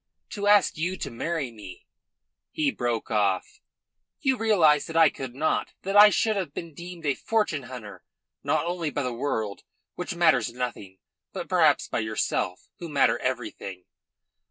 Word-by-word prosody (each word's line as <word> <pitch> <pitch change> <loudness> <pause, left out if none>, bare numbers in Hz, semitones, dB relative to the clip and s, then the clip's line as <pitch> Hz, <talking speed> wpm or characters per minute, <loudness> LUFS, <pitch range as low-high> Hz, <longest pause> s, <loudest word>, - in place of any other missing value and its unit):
To 205 -2 -3
ask 205 -4 +5
you 180 +3 -1
to - - -5
marry 145 +2 -3
me 100 -5 -12 0.3
" - - -60
He 295 -3 +3
broke 120 - -2
off. 100 -4 0 0.6
"You 265 -1 +2
realise 175 - +3
that 165 - -3
I 160 -3 +6
could 130 -2 -7
not; 155 +3 0
that 195 +1 -2
I 210 +1 +10
should 215 +1 +1
have 185 -7 -3
been 165 -2 -6
deemed 170 +1 -9
a 140 - +2
fortune 190 - -1
hunter, 110 -5 -9 0.4
not - - +1
only 170 -2 -2
by 145 0 -2
the 125 -1 -2
world, 110 -5 -3 0.3
which 180 0 -5
matters 160 -10 +3
nothing, 120 -6 -5 0.4
but - - -5
perhaps - - +3
by - - -2
yourself, 110 -4 -2
who 170 - -6
matter 140 -3 +3
everything. 115 -7 -4
150 Hz, 165 wpm, -26 LUFS, 115-180 Hz, 0.6 s, I